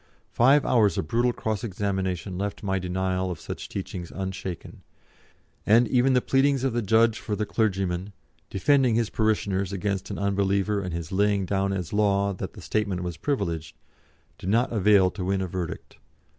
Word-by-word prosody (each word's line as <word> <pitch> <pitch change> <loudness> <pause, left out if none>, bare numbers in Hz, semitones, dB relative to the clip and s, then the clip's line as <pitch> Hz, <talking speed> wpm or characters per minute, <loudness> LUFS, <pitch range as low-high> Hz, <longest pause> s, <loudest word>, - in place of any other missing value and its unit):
Five 135 +5 +4
hours 105 -7 +3
of 80 - -2
brutal 120 +4 +2
cross 110 -1 -3
examination 95 -3 -2
left 100 +3 -4
my 95 -1 0
denial 95 +1 -1
of 90 - -5
such - - -7
teachings 85 -2 -5
unshaken, 95 -2 -6 0.8
and 115 +3 +5
even 130 +1 +3
the 125 - +3
pleadings 135 0 +2
of 135 -3 0
the 120 - 0
judge 110 +2 +3
for 105 - -3
the 105 - -1
clergyman, 95 -3 -1 0.4
defending 125 +4 +3
his 115 -2 0
parishioners 100 -3 0
against 100 0 -2
an - - -4
unbeliever 100 +1 +1
and 90 -2 -4
his 85 -2 -5
laying 100 0 +2
down 100 +1 0
as 90 -3 -4
law 100 -1 +2
that 95 - -6
the - - -11
statement 100 -4 -1
was 90 -2 -4
privileged, 85 - -2 0.6
did 90 - -4
not 120 +4 +2
avail 100 -3 +4
to 95 - -6
win 95 +1 0
a 95 - -1
verdict. 90 -1 -6
100 Hz, 170 wpm, -26 LUFS, 95-110 Hz, 0.8 s, and